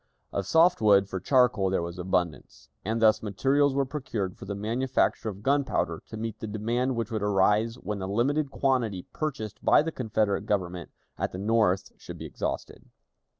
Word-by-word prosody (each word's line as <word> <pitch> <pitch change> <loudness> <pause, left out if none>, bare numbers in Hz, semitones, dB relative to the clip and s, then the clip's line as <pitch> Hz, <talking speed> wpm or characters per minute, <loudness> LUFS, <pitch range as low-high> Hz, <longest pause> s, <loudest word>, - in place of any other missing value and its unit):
Of 100 - -2
soft 165 -3 +4
wood 100 -2 +5
for 95 -1 -4
charcoal 125 -3 +3
there 95 -2 0
was 85 +1 -6
abundance, 85 -8 -2
and 110 +4 -1
thus 110 -1 +4
materials 135 +7 +1
were 140 0 +2
procured 115 -9 -4
for - - -10
the 100 +1 -4
manufacture 115 +2 0
of 100 0 -9
gunpowder 140 +2 0
to 110 - -8
meet 110 0 -5
the 110 - -5
demand 120 +5 -1
which 115 0 -3
would 110 -2 -2
arise 105 +3 +2
when 105 -4 -5
the 95 - -4
limited 135 +8 +1
quantity 120 -10 0
purchased 125 -9 -4
by - - +5
the 165 - -3
Confederate 110 -6 -1
Government 90 -4 -2 0.3
at - - -2
the - - -5
North 105 -2 +1
should - - -9
be - - -7
exhausted. - - -5
110 Hz, 180 wpm, -27 LUFS, 100-125 Hz, 0.3 s, wood